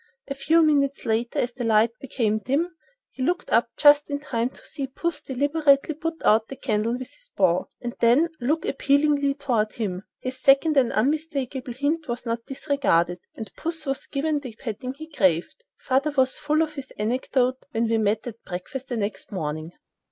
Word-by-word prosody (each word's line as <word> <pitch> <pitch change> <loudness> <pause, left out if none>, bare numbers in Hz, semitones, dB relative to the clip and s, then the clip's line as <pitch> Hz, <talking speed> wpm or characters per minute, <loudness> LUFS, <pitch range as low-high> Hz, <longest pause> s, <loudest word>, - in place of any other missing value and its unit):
A 275 - -2
few 315 +4 +3
minutes 280 -3 +2
later, 230 +1 0
as 245 0 0
the 245 0 -5
light 225 0 +4
became 225 -5 0
dim, 310 +10 -1 0.4
he - - -9
looked 355 +7 -1
up 230 +1 +3
just 290 0 +6
in 285 0 -2
time 250 -5 -1
to - - -17
see 275 -2 -4
puss 300 +3 -3
deliberately 285 +2 +2
put 325 +2 -3
out 220 +1 +4
the 270 - -7
candle 225 -3 0
with 250 +1 -6
his - - -14
paw, 180 -1 +3
and 240 -1 -5
then 250 +9 +4
look 300 +6 0
appealingly 280 0 +2
toward 240 -7 0
him. 190 -5 -3 0.2
This 255 0 -5
second 280 +3 +5
and 260 -4 +4
unmistakable 270 -1 -1
hint 290 +6 -1
was 240 0 -4
not 230 0 -3
disregarded, 260 - +1 0.2
and 220 -3 -7
puss 320 -1 -4
was 270 -1 -3
given 295 +1 0
the 255 -6 -9
petting 250 +3 -5
he 315 +2 -9
craved. 190 - 0
Father 270 +3 +1
was 260 0 +3
full 305 +1 +1
of 310 -1 -4
this 275 -3 -7
anecdote 255 +3 0
when 230 -4 0
all 225 - +3
met 215 +1 +1
at 230 -2 -8
breakfast 220 +9 -6
the 245 - -2
next 200 -1 -4
morning. 155 -3 -3
265 Hz, 185 wpm, -25 LUFS, 230-290 Hz, 0.4 s, just